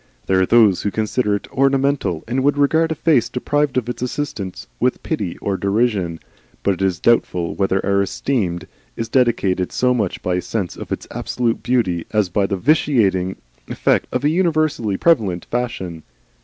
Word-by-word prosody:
There 95 0 +2
are 95 - +2
those 110 -6 +5
who 105 - 0
consider 110 +1 0
it 100 - -6
ornamental, 135 - +1
and 130 +3 -1
would 145 +1 +2
regard 160 +3 +3
a - - -1
face 150 -5 +2
deprived 145 +2 0
of 120 -2 0
its 120 -1 -5
assistance 125 -7 -4
with - - 0
pity - - -3
or 100 -1 -2
derision; 100 -5 0 0.4
but 100 - +2
it 95 - -7
is 95 -4 +1
doubtful 90 -7 +1
whether 95 -1 0
our 100 0 +2
esteem 100 -4 -1 0.3
is 115 - -4
dictated 100 -8 +1
so 125 0 +2
much 105 -7 -2
by 90 0 0
a - - -1
sense 90 -1 -3
of - - -9
its - - -3
absolute 120 -2 -2
beauty 95 -10 0
as 105 -4 +1
by 100 +2 +1
the 100 - -2
vitiating 100 - +2 0.3
effect - - +1
of - - -1
a 145 - +3
universally 155 - +1
prevalent 105 - +2
fashion. 95 -9 -3
110 Hz, 175 wpm, -20 LUFS, 95-130 Hz, 0.4 s, those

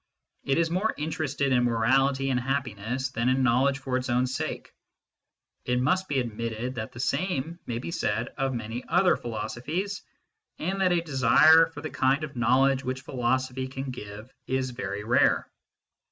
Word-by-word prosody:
It 135 - +1
is 165 0 +1
more 195 +6 0
interested 150 -3 -1
in 125 -1 +3
morality 135 +4 +2
and 125 - +1
happiness 130 -1 -2
than 115 +1 0
in 130 +1 +2
knowledge 130 +3 +3
for 130 -1 -2
its 130 0 -4
own 125 +1 +2
sake. 130 +1 -4 0.9
It 125 0 0
must 185 +9 +1
be 145 - -1
admitted 115 +1 -3
that 110 -3 -5
the 120 - -11
same 170 +2 -1
may 115 - -2
be 130 +8 -5
said 115 -7 -1
of 135 -1 -1
many 115 0 -5
other 180 +2 +4
philosophies, 145 - -4 0.6
and 190 +4 -2
that 185 -1 +3
a 175 -1 +2
desire 155 +2 +6
for 160 -3 -10
the 155 - -5
kind 135 +3 +1
of 140 -3 -6
knowledge 130 +3 +3
which 130 0 -3
philo 130 -2 0
sophy 130 0 -5
can 135 0 -5
give 105 0 -9
is 130 -1 -1
very 105 -4 -4
rare. 120 +3 +3
130 Hz, 170 wpm, -27 LUFS, 120-145 Hz, 0.9 s, desire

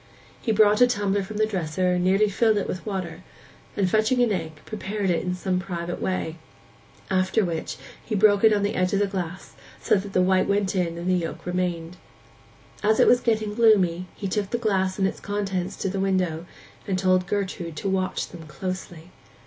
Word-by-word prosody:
He 230 - 0
brought 210 +1 +4
a 245 - +8
tumbler 205 -4 0
from 205 +2 -6
the 215 - +3
dresser, 180 -2 0
nearly 190 +4 +3
filled 215 +1 +2
it 200 - -1
with 185 - -4
water, 185 -4 -4 0.5
and 195 -2 +2
fetching 220 +6 +2
an 235 - +1
egg, 165 -5 -2
prepared 205 -2 -2
it 170 - +1
in 180 0 -2
some 185 0 -1
private 175 -2 -5
way; 175 -3 -2 0.7
after 190 +3 +2
which 165 -2 -4 0.3
he 215 - -3
broke 205 0 +4
it 220 - +7
on 205 -1 +2
the 205 - 0
edge 185 +1 0
of 200 - +2
the 205 - +3
glass, 190 -2 -5 0.3
so - - 0
that 195 -1 0
the 185 - +3
white 185 0 +3
went 200 -1 +1
in 170 -2 -1
and 170 +1 -5
the 185 - +3
yolk 165 -2 -3
remained. 175 -1 -2 0.8
As 215 +1 +2
it - - +7
was 245 - +5
getting 215 -2 0
gloomy, 190 -6 +3
he 200 - -4
took 200 +1 -1
the 240 - -1
glass 190 -5 0
and 190 -1 +2
its - - -5
contents 195 -3 -3
to - - -3
the 195 +1 -2
window, 180 -4 0 0.4
and 190 -2 0
told 185 -1 +2
Gertrude 190 -5 -3
to 175 - -4
watch 190 -1 -1
them 165 -3 -11
closely. 175 +2 -6
190 Hz, 200 wpm, -25 LUFS, 180-205 Hz, 0.8 s, a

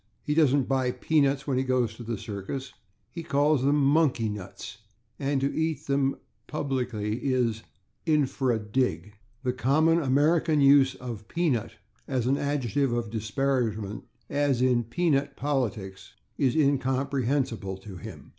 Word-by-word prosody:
He 150 - -1
doesn't 145 -4 +3
buy 130 -2 +1
/peanuts/ 140 -1 +1
when 130 -3 0
he - - +1
goes 125 -4 +1
to 110 - -12
the 115 -1 -4
circus. 105 +7 -6 0.4
He 170 - -6
calls 145 -2 +2
them 140 +2 +3
/monkey 140 -7 +2
nuts/, 100 0 -8 0.4
and 140 0 0
to 140 - -1
eat 160 0 -1
them 140 -1 +1 0.3
publicly 125 -7 -2
is 125 -4 0 0.5
/infra 135 -5 +2
dig/. 125 -4 0 0.3
The 125 -1 0
common 155 +7 +3
American 150 +3 +2
use 140 -1 +5
of 115 -4 -7
/peanut/ 155 -10 -1 0.3
as 130 -4 -1
an 135 +3 +1
adjective 140 -2 0
of 120 -2 -2
disparagement, 110 -2 -1 0.2
as 140 -3 +1
in 125 -2 +2
/peanut 145 +2 0
politics/, 105 -9 -3 0.2
is 130 -3 +1
incomprehensible 135 -6 0
to 95 -1 -10
him. - - -10
130 Hz, 135 wpm, -27 LUFS, 115-145 Hz, 0.5 s, use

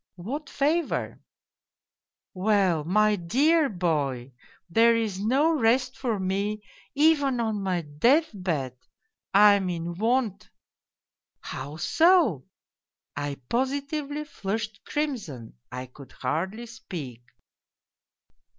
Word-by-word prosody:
'' - - -66
' - - -58 0.2
What 290 0 -4
favour? 305 +4 -1 0.3
' - - -66
" - - -66
' - - -66
Well, 190 -4 +2
my 210 +5 +3
dear 280 - +2
boy, 145 - -1 0.4
there 230 +6 +4
is 215 -5 -1
no 270 +10 +2
rest 255 +1 +2
for 235 -6 -2
me 200 +3 -2 0.3
even 285 -4 +3
on 220 -3 -1
my 185 -3 -1
dcath 180 - +1 0.3
})<(!. 445 0 -53
I 205 +1 +8
am 195 -2 0
in 170 0 -3
want.' 215 0 -1 0.3
" - - -66
' - - -59
How 145 +4 -6
so? 320 - +3 0.4
' - - -67 0.3
I 145 0 -3
positively 285 +3 -2
flushed 215 -4 -4
crimson, 210 - -4
I 125 0 -5
could 130 +2 -15
hardly 185 - -3
speak. 165 - -8
210 Hz, 125 wpm, -26 LUFS, 170-265 Hz, 0.4 s, I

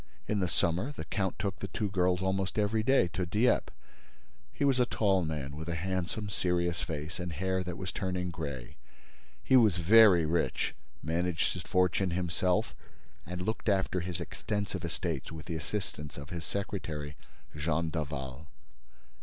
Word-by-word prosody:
In 105 - +1
the 90 - +2
summer, 85 - +1
the 130 - -7
count 95 +2 -1
took 95 -3 -2
the 100 - -3
two 105 +2 -2
girls 90 -1 +2
almost 95 +1 0
every 105 +1 +2
day 130 -4 +4
to 90 - -2
Dieppe. 110 +7 +2 0.8
He 145 - 0
was 135 -2 +3
a 125 - +4
tall 95 -6 +2
man, 75 -3 -3
with 80 +2 -5
a 85 - -1
handsome, 95 +4 -2
serious 90 -3 0
face 80 +2 -4
and 90 -1 -3
hair 95 +3 0
that 90 -1 -5
was 90 -1 -4
turning 90 -1 -2
gray. 70 -7 -6 0.7
He 130 - +4
was 110 -8 +6
very 95 -1 +7
rich, 85 +2 0 0.3
managed 85 +1 0
his - - -5
fortune 90 +1 +2
himself 90 +1 0 0.5
and 90 +1 -4
looked 110 +3 -1
after 95 -2 +2
his 90 0 -3
extensive 100 +2 -3
estates 85 -3 -3
with 80 -1 -7
the 85 - -4
assistance 75 -3 -4
of 70 +1 -8
his 85 -2 -4
secretary, 80 -7 -3 0.4
Jean 80 +2 0
Daval. 70 -2 -4
90 Hz, 160 wpm, -31 LUFS, 80-95 Hz, 0.8 s, very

